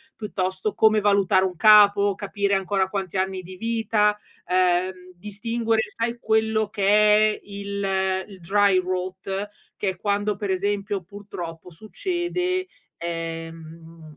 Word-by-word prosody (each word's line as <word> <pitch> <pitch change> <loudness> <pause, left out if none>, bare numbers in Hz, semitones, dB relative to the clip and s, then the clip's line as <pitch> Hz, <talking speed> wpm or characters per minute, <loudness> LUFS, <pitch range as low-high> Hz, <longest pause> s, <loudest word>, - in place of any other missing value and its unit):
piuttosto 190 -1 -3
come 215 -1 +4
valutare 200 -2 +3
un 185 - -3
capo, 205 -1 +6
capire 200 0 -2
ancora 190 0 0
quanti 190 -2 -4
anni 190 0 -1
di 185 +1 -11
vita, 220 -1 +1 0.3
ehm, 185 0 0
distinguere 225 +3 -1
sai 235 +1 -2
quello 220 -1 +1
che 200 -1 -2 0.5
è - - -12
il 195 -2 -2
il 195 -3 -13
dry 200 +1 +3
rote 185 +2 -4 0.3
che 200 - -1
è 185 - -4
quando 205 +1 -1
per 200 0 -5
esempio, 200 0 -1
purtroppo 180 -4 -9
succede, 360 - -3 0.3
ehm, 165 -1 -7
200 Hz, 125 wpm, -24 LUFS, 185-210 Hz, 0.5 s, capo